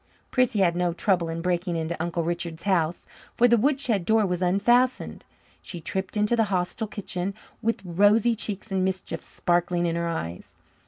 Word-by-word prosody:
Prissy 250 -5 +2
had 175 -2 +3
no 175 -1 0
trouble 175 -1 +1
in 165 +1 -4
breaking 175 -1 0
into 165 +1 -2
Uncle 170 0 -1
Richard's 170 -1 -4
house, 175 -4 0 0.3
for 245 - +5
the 235 - +5
woodshed 255 -5 +1
door 220 +3 +3
was 180 -1 -2
unfastened. 240 +8 +2 0.4
She 175 - -7
tripped 190 +5 -3
into 210 +3 +2
the 225 -1 +3
hostile 190 +2 -2
kitchen 195 -2 -4 0.3
with 230 -4 -1
rosy 205 +6 +4
cheeks 210 -1 -5
and 190 -1 +1
mischief 185 -3 -3
sparkling 175 0 0
in 165 -1 0
her 170 0 -1
eyes. 90 - -5
185 Hz, 170 wpm, -25 LUFS, 170-210 Hz, 0.4 s, for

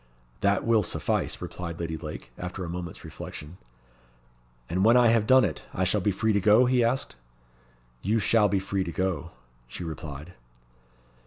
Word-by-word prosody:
"That 100 -1 +1
will 115 -2 +4
suffice," 90 - -1
replied 85 -2 -6
Lady 80 -1 -3
Lake, 80 -1 -8
after 90 +1 -5
a - - -6
moment's 85 -1 -6
reflection. 75 +5 -9 1.1
"And 90 +3 0
when 115 +3 +6
I 120 -1 +6
have 110 -2 +3
done 130 -2 +6
it, 80 -7 -4
I 95 - +1
shall 95 +3 +1
be 105 - +1
free 110 +3 +1
to 100 - +2
go?" 110 +6 +6
he 125 -1 +3
asked. 120 - -1 0.8
"You 105 +5 +1
shall 105 -1 +3
be 100 - +1
free 95 0 -1
to 85 - -5
go," 85 -3 -2 0.4
she 75 - -7
replied. 80 0 -7
95 Hz, 170 wpm, -27 LUFS, 85-110 Hz, 1.1 s, when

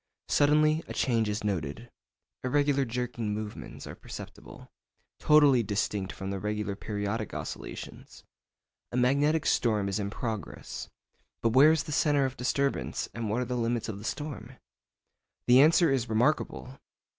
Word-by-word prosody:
Suddenly 155 +2 +3
a - - -7
change 115 -4 +1
is 105 +1 -3
noted; 100 +3 -3 0.5
irregular 140 +1 +2
jerking 120 -3 -3
movements 105 -1 -7
are - - -7
perceptible, - - -11 0.5
totally 145 -5 +5
distinct 100 -2 -2
from 95 0 -6
the 100 - -3
regular 105 0 -2
periodic 105 +1 -3
oscillations. - - -8 0.7
A 125 - -2
magnetic 145 +5 +2
storm 105 -4 +2
is 100 +2 -1
in 100 -1 -2
progress. 110 -3 -5 0.5
But 115 - +4
where 140 +5 +7
is 160 -1 +1
the 155 - -7
centre 145 -1 +2
of 130 0 -3
disturbance, 140 +2 -1
and 115 -2 -3
what 115 +4 0
are - - -1
the 125 +1 -3
limits 120 -1 -1
of 100 -2 -5
the - - -10
storm? 135 -1 -5 0.9
The 125 +2 +7
answer 160 +1 +5
is 125 -4 0
remarkable. 125 +2 0
120 Hz, 145 wpm, -29 LUFS, 105-140 Hz, 0.9 s, where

